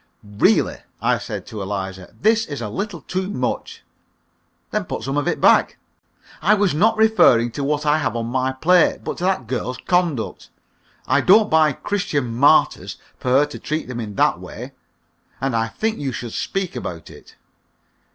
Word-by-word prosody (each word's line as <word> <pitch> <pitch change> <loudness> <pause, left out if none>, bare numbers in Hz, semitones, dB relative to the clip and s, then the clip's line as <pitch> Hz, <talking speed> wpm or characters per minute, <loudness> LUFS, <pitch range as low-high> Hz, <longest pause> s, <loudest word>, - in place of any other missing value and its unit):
"Really," 105 0 +1 0.2
I - - +1
said - - -6
to 105 - -7
Eliza, 95 -1 -5
"this 220 +2 +2
is 145 -2 -5
a 110 -3 -4
little 195 - -4
too 185 +1 -3
much!" 125 -11 -4 0.9
"Then - - -1
put - - -5
some 135 +1 -3
of 145 -1 0
it - - 0
back." - - +4 0.6
"I 200 +7 +4
was 200 -5 +1
not 215 +9 +2
referring 215 - +4
to 140 +5 -4
what 150 +1 -1
I 150 +1 +3
have 130 -6 -2
on 115 -1 -2
my 130 +2 -1
plate, 170 +7 +2
but - - -5
to 175 - -2
that 185 -9 0
girl's 125 +1 -3
conduct. 175 -10 -1 0.6
I - - +2
don't 215 +3 +5
buy 155 -2 +4
'Christian 145 - -2
Martyrs' 145 +5 +3 0.2
for 125 - -3
her 135 +3 +4
to 145 - -9
treat 155 +1 -3
them 125 -1 -5
in 105 -3 -6
that - - +2
way, - - -9 0.7
and 135 -2 -1
I 115 0 +1
think 220 - -3
you 140 -2 -2
should 120 -1 -6
speak 195 -3 -3
about 85 -2 -6
it." - - -16
145 Hz, 180 wpm, -21 LUFS, 120-180 Hz, 0.9 s, don't